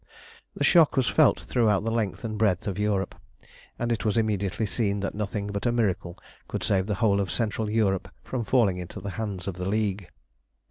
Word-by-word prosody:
The - - -2
shock 165 -6 +5
was 130 -3 +3
felt 155 -4 +4
throughout 110 -5 +2
the 115 - -1
length 110 -2 -1
and 110 -2 -3
breadth 105 -4 +1
of 100 -1 -3
Europe, 100 -3 0 0.6
and 120 0 -1
it 115 - -1
was 110 +1 +1
immediately 105 -3 0
seen 100 0 -1
that 100 - -2
nothing 105 0 -3
but 100 +3 -2
a - - +3
miracle 95 -6 -1 0.3
could - - -4
save 95 -1 +1
the 105 - 0
whole 100 -1 +2
of 95 - -2
Central 110 +1 -1
Europe 105 -4 +1
from 125 -3 -3
falling 105 -5 +2
into 90 +3 -7
the 100 +1 -5
hands 100 -4 -4
of 95 -2 -4
the 90 +1 -2
League. 100 -3 -1
105 Hz, 200 wpm, -26 LUFS, 95-115 Hz, 0.6 s, shock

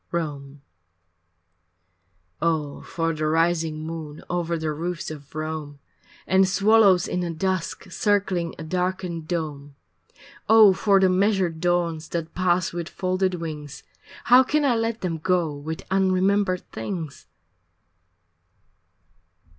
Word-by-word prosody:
VII 170 - 0
Rome 140 -3 -6 1.8
Oh 155 -3 -1
for 165 -3 -2
the 155 0 -2
rising 160 -1 +1
moon 155 -2 -7
Over 170 -1 -1
the 160 -1 -2
roofs 170 +2 -4
of 145 -2 -11
Rome, 155 -2 -5 0.5
And 190 +1 +3
swallows 200 -2 +4
in 180 - -2
the 175 -1 -2
dusk 185 +1 -3
Circling 190 -3 0
a - - -7
darkened 180 -1 -3
dome! 150 -5 -4 0.7
Oh 220 -3 +8
for 195 0 +3
the 190 - +4
measured 185 -3 +1
dawns 170 -2 0
That 165 -1 -4
pass 185 0 +1
with 170 0 -4
folded 185 0 -1
wings 155 -4 -7 0.4
How 250 +1 +7
can 295 +3 +1
I 265 - +3
let 225 0 -1
them 165 -3 -2
go 175 -2 +1
With 155 +3 -6
unremembered 190 0 +2
things? 150 - -6
175 Hz, 125 wpm, -24 LUFS, 160-190 Hz, 1.8 s, Oh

